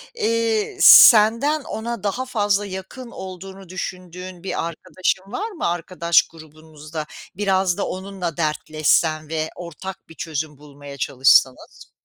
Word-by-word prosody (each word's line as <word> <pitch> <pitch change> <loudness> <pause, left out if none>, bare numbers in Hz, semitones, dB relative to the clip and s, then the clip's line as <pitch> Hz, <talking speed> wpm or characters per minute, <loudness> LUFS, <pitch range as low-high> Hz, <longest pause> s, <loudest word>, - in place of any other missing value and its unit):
eee, 230 - -1
senden 235 - +7
ona 230 -3 -5
daha 225 +6 -2
fazla 205 -4 0
yakın 195 +6 -8
olduğunu 190 0 -10
düşündüğün 180 0 -7
bir 185 -3 -3
arkadaşın 185 +4 -3
var 430 - -4
mı, 355 - -3
arkadaş 170 0 +2
grubunuzda? 155 -1 -10 0.3
Biraz 190 -2 0
da - - -2
onunla 185 -3 -5
dertleşsen 155 0 0
ve 160 0 -2
ortak 175 +1 -9
bir 165 - -14
çözüm 155 -2 -5
bulmaya 145 -1 -12
çalışsanız. 130 -1 +2
185 Hz, 120 wpm, -21 LUFS, 155-205 Hz, 0.3 s, senden